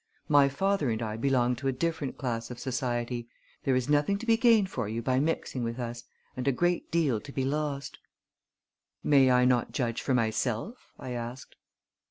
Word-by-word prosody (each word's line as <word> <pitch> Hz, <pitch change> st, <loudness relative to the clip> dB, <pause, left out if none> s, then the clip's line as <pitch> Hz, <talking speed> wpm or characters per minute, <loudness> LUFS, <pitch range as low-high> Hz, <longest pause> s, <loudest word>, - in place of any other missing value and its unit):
My 145 Hz, -2 st, +5 dB
father 190 Hz, 0 st, 0 dB
and 110 Hz, -1 st, -1 dB
I 110 Hz, -2 st, -3 dB
belong 125 Hz, 0 st, +2 dB
to 135 Hz, +2 st, -3 dB
a -, -, +3 dB
different 160 Hz, +1 st, -2 dB
class 115 Hz, -4 st, -3 dB
of 125 Hz, -, -7 dB
society. 120 Hz, -2 st, -2 dB, 0.4 s
There 135 Hz, -, +3 dB
is 125 Hz, -1 st, 0 dB
nothing 150 Hz, +7 st, +2 dB
to 230 Hz, -, -7 dB
be 230 Hz, -1 st, +5 dB
gained 225 Hz, -4 st, +4 dB
for 115 Hz, -5 st, -3 dB
you 115 Hz, +2 st, -3 dB
by 130 Hz, +1 st, +2 dB
mixing 145 Hz, -4 st, -1 dB
with 115 Hz, 0 st, -3 dB
us, 120 Hz, -1 st, -5 dB, 0.3 s
and 130 Hz, +1 st, -4 dB
a -, -, +5 dB
great 175 Hz, +6 st, 0 dB
deal 145 Hz, -10 st, +1 dB
to 140 Hz, -, -10 dB
be 135 Hz, -1 st, -1 dB
lost." 140 Hz, -1 st, -3 dB, 1.0 s
"May 135 Hz, -3 st, +5 dB
I 125 Hz, 0 st, +4 dB
not 125 Hz, -2 st, +2 dB
judge 120 Hz, -3 st, -1 dB
for 130 Hz, -, +1 dB
myself?" 115 Hz, -, -2 dB
I 130 Hz, -, -7 dB
asked. 120 Hz, +1 st, -6 dB
130 Hz, 190 wpm, -29 LUFS, 120-145 Hz, 1.0 s, My